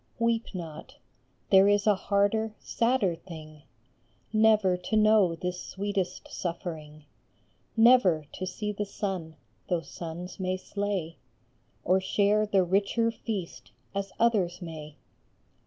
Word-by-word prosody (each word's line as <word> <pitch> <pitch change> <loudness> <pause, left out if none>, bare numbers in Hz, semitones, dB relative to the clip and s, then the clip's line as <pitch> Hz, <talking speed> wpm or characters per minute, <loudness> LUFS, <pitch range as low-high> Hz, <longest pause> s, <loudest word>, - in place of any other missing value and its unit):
Weep 230 -2 0
not; 160 -4 -8 0.6
there 195 0 +7
is 205 0 +3
a 210 - +6
harder, 205 +3 +1
sadder 230 -6 +1
thing, 155 -3 -11 0.7
Never 215 -4 +4
to 180 +5 -3
know 215 -5 +5
this 180 +1 -4
sweetest 195 -2 -3
suffering! 160 -4 -6 0.7
Never 225 -10 +5
to 185 - -4
see 210 +3 -3
the 205 0 -4
sun, 185 -6 -4 0.3
though 175 -2 +1
suns 170 +4 -8
may 185 0 -1
slay, 195 -4 -3 0.7
Or 185 +1 +3
share 205 +2 +2
the 195 -2 +3
richer 200 +5 +1
feast 210 -6 -6 0.2
as 195 -1 -3
others 195 -7 +2
may. 155 -4 -8
190 Hz, 120 wpm, -28 LUFS, 175-210 Hz, 0.7 s, there